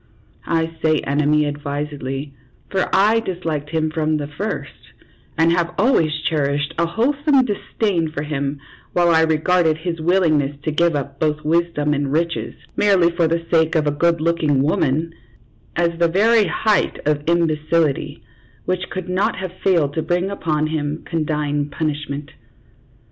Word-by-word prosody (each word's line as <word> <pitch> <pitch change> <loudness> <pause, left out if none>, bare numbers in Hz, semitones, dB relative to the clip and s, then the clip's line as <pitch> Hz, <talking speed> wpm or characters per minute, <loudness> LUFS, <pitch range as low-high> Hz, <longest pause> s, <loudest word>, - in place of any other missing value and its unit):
I 165 0 -1
say 155 -1 +3
enemy 150 +2 +2
advisedly, 145 -1 -4 0.4
for 190 -1 0
I 210 +4 +4
disliked 165 -8 -4
him 155 -1 -1
from 155 -1 0
the 145 - -3
first, 145 0 -6 0.4
and 165 +1 +4
have 170 0 0
always 195 - +3 0.2
cherished 145 0 0
a 170 - +2
whole 230 +11 +1
some 280 -4 +4
disdain 200 -5 -1
for 150 -1 -4
him, 140 -1 -3 0.3
while 175 -1 +3
I 160 -1 +5
regarded 160 +1 +2
his 165 0 -4
willingness 155 -5 +2
to 155 - -1
give 170 +1 +2
up 140 -1 -4
both 155 -1 0
wisdom 160 -2 +1
and 140 -1 -1
riches, 165 +2 -1 0.2
merely 190 -4 +3
for 170 -1 +1
the 165 +1 -1
sake 160 0 +3
of 155 -2 +2
a 145 - +2
good 170 +3 +1
looking 155 -4 +1
woman, 155 +2 0 0.6
as 170 -1 0
the 170 - +4
very 210 +4 +3
height 210 +5 +1
of 150 -1 +1
imbecility, 160 -2 0 0.4
which 185 0 -2
could 185 -2 -5
not 185 +2 0
have 185 -1 -5
failed 165 -7 +2
to 160 - -1
bring 175 +4 -1
upon 155 -5 -1
him 155 -1 -3
condign 150 -3 -1
punishment. 145 -1 -4
160 Hz, 155 wpm, -20 LUFS, 150-170 Hz, 0.6 s, I